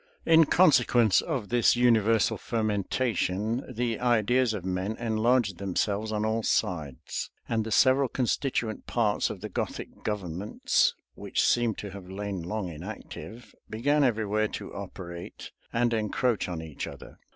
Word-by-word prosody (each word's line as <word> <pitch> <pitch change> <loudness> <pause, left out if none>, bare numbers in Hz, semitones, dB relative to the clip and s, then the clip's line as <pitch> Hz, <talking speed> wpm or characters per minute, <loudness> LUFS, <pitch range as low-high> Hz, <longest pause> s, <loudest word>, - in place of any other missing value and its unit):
In 165 0 +6
consequence 120 - +4
of 135 - -3
this 120 0 +4
universal 115 -3 +3
fermentation, 110 0 -1
the 120 -1 -2
ideas 120 +1 +2
of 95 -3 -6
men 95 +4 -2
enlarged 115 -3 +1
themselves 100 +3 -1
on 105 0 -1
all 110 +1 0
sides; 75 - -2 0.2
and 110 -1 0
the 110 - -6
several 130 +3 +4
constituent 120 -3 -1
parts 110 -4 +1
of - - -7
the - - -4
Gothic - - -5
governments, 100 -2 0 0.2
which - - -1
seem 120 -3 +2
to 100 - -7
have 95 -2 -10
lain 100 -1 -4
long 100 +3 -3
inactive, 100 +6 -9 0.2
began 145 +7 +2
everywhere 110 -3 +1
to - - -7
operate 85 -1 -8 0.2
and 120 0 +1
encroach 110 0 0
on 85 -2 -4
each 80 -3 -6
other. - - -11
110 Hz, 140 wpm, -28 LUFS, 100-120 Hz, 0.2 s, In